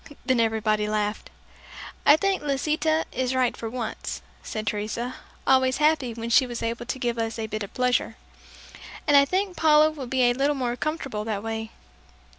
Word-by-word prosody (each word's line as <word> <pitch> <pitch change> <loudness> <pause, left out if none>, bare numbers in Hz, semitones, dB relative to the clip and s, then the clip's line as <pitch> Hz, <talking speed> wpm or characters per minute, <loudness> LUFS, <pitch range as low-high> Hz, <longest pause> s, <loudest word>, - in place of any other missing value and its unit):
Then 260 -2 +2
everybody 215 -2 +1
laughed. 210 0 -2 0.8
"I 290 - +8
think 390 0 0
Lisita 305 +3 0
is 260 0 -1
right 255 -2 +2
for 225 - -5
once," 235 -2 -5 0.2
said 215 0 -5
Teresa, 220 +4 -3 0.3
always 260 -1 +4
happy 300 -5 +2
when 230 0 -5
she 260 +2 +5
was 240 -1 -5
able 230 +1 -3
to 260 - -2
give 240 -2 -2
us 225 0 -2
a 225 - -3
bit 215 0 -4
of 200 - -5
pleasure; 250 0 +1 0.9
"and 290 - +4
I 280 0 +8
think 375 +3 -1
Paula 310 -1 +5
will 285 -5 -7
be 260 +1 +1
a 245 0 +4
little 280 +3 +1
more 245 -3 -1
comfortable 270 -7 -3
that 215 -2 -3
way." 225 0 -4
250 Hz, 180 wpm, -25 LUFS, 225-285 Hz, 0.9 s, I